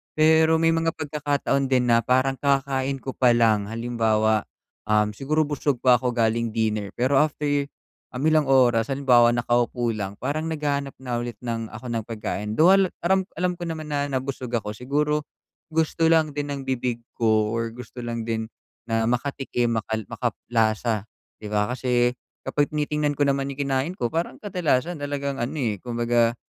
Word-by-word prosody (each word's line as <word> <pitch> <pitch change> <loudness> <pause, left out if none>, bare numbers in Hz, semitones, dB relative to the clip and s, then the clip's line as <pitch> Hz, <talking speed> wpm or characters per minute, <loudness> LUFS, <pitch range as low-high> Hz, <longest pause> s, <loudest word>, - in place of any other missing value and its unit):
Pero 160 +1 +5
may 165 0 +3
mga 165 0 0
pagkakataon 145 -2 -1
din 125 -2 +2
na 115 - +6
parang 130 +2 +1
kakakain 135 -1 +1
ko 135 - -3
palang 115 -5 +3
halimbawa, 110 -2 +1 0.4
um, 105 0 +2
siguro 150 +8 0
busog 145 -3 -2
pa 125 -2 +6
ako 125 -2 -2
galing 115 0 0
dinner, 105 -3 -1
pero 130 +3 +2
after, 145 -1 0 0.5
um, 125 - -3
ilang 155 -2 +3
oras 120 -4 +4
halimbawa 125 -4 +4
nakaupo 120 0 +1
lang 100 -2 -4
parang 145 +8 -3
naghahanap 145 -3 -2
na 125 -2 -4
ulit 120 -2 -5
ng 115 -2 -3
ako 120 +2 -7
ng 115 -2 -3
pagkain. 105 -2 -4
Though 165 +7 +6
al 195 -1 +5 0.2
alam 190 +1 +2
alam 180 +1 -1
ko 175 - -4
naman 155 -2 -5
na 145 -1 0
nabusog 130 -2 -3
ako 105 -2 -2
siguro, 145 +6 -1 0.5
gusto 160 +1 +1
lang 160 -1 +4
din 145 0 -3
ng 140 - -5
bibig 125 -2 -2 0.2
ko 110 -2 +2
or 115 0 -2
gusto 125 0 -10
lang 120 -1 -4
din 110 -1 -2 0.4
na 115 0 0
makatikim 120 -3 -1
makal 110 0 -4
makalasa 110 -2 -1 0.3
'di 105 - -6
ba 105 +3 0
kasi, 125 -1 +1 0.3
kapag 145 -1 +1
tinitingnan 150 -1 -1
ko 145 - +3
naman 140 0 0
yung 140 +1 -3
kinain 135 +7 -1
ko 120 - 0
parang 165 +1 -2
kadalasan 175 -5 -1
talagang 140 -1 -3
ano, 120 +6 -3
eh, 110 -9 -1
kumbaga, 120 -1 +1
130 Hz, 165 wpm, -24 LUFS, 115-145 Hz, 0.5 s, na